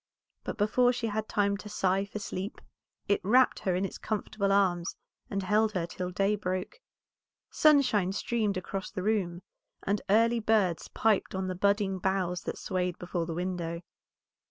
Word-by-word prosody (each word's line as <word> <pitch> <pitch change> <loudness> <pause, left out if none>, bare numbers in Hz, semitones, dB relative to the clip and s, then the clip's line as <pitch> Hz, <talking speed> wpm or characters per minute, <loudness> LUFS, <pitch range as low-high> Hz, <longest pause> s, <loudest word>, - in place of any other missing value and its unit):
But - - -5
before 245 +4 +3
she 245 -1 -3
had 215 0 -2
time 200 -1 +1
to 210 - -9
sigh 195 -1 +1
for 200 - -7
sleep 200 0 -5 0.5
it 200 - +2
wrapt 250 +7 +4
her 185 -2 0
in 185 +2 0
its - - -6
comfortable 205 -2 -1
arms, 180 -4 +2 0.3
and 195 -1 -2
held 210 +3 +2
her 180 -4 -1
till 180 +1 -5
day 195 +3 +1
broke. 185 - -4 0.7
Sunshine 260 - +4
streamed 210 -1 -1
across 190 +1 -4
the 185 -3 -5
room, 185 -5 0 0.4
and 200 +1 0
early 230 +3 +4
birds 210 -6 +1
piped 215 -3 +1
on 190 0 -2
the 185 - -2
budding 200 0 +1
boughs 180 -1 0
that - - -3
swayed 180 -2 -2
before 175 -1 -3
the 165 - -4
window. 175 -1 -3
195 Hz, 165 wpm, -29 LUFS, 185-210 Hz, 0.7 s, wrapt